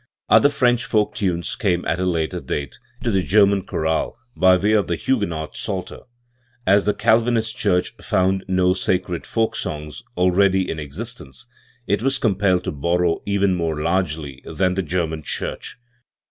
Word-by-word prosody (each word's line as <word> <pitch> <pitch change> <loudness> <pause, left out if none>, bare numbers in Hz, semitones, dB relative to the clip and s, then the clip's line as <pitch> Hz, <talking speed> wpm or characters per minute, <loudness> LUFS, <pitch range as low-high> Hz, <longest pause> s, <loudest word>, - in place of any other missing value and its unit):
* - - -49
Other 110 +6 +7
French 125 -4 +2
folk 105 -1 +1
times 90 -4 -1
came 90 -4 0
at 85 - -1
a 95 - 0
later 85 0 -1
dale 70 -1 -3 0.3
into 120 -2 0
the 95 -2 +2
German 100 +1 +4
chorale 80 +6 -1 0.2
by 95 0 +5
way 100 +4 +1
of 105 -4 +2
the 85 - 0
Huguenot 85 -10 -2
Psalter, 95 -2 -4 0.7
As 100 +2 +4
the 105 - +1
Calvinist 115 0 +2
church 100 -8 0
found 95 +1 +1
no 90 -1 +3
sacred 90 -1 -2
folk 115 -1 0
songs 75 -2 -5 0.2
already 95 +1 +3
in 80 - -4
existence, 75 - -6 0.4
it 100 +1 0
was 135 +2 +2
compelled 95 -5 +1
to - - -3
borrow 85 +3 0
even 100 -1 +2
more 80 -3 -1
largely 80 -5 -2
than 90 -1 0
the 95 - 0
German 80 -2 -2
Church. 75 - -3
95 Hz, 160 wpm, -21 LUFS, 85-105 Hz, 0.7 s, Other